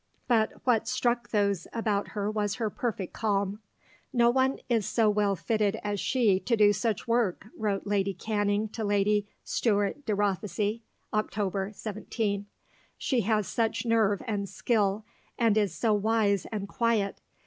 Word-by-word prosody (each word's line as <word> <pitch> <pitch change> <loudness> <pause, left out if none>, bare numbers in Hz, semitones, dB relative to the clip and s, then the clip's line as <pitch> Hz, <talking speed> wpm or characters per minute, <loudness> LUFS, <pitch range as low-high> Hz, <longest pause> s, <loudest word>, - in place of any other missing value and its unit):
But 225 -3 +3
what 225 -3 +2
struck 240 -1 0
those 200 -5 +1
about 215 -3 -1
her 205 +1 0
was 210 -1 -1
her 220 -3 -2
perfect 210 -6 -3
calm. 200 -1 0 0.5
"No 240 -1 +4
one 265 +1 +2
is 225 -5 +1
so 220 -3 +3
well 205 -1 +2
fitted 215 +1 0
as 205 -1 -2
she 215 -7 +2
to 230 +5 0
do 205 -1 +6
such 210 +2 -1
work," 230 -6 +1
wrote 205 -3 -1
Lady 200 -1 0
Canning 205 +1 0
to 220 +1 -5
Lady 205 0 +2 0.2
Stuart 205 +5 0
de 210 - +1
Rothesay 205 +2 -1 0.3
(Oct. 205 -1 -1
17); 205 -1 -3 0.5
"she 255 -4 +1
has 215 -1 +1
such 225 0 -1
nerve 220 -4 +2
and 200 -3 -2
skill, 210 -2 0 0.3
and 230 -3 +3
is 210 -3 +2
so 225 -2 +1
wise 205 -2 +2
and 205 -2 -3
quiet. 220 -3 0
210 Hz, 150 wpm, -28 LUFS, 200-225 Hz, 0.5 s, do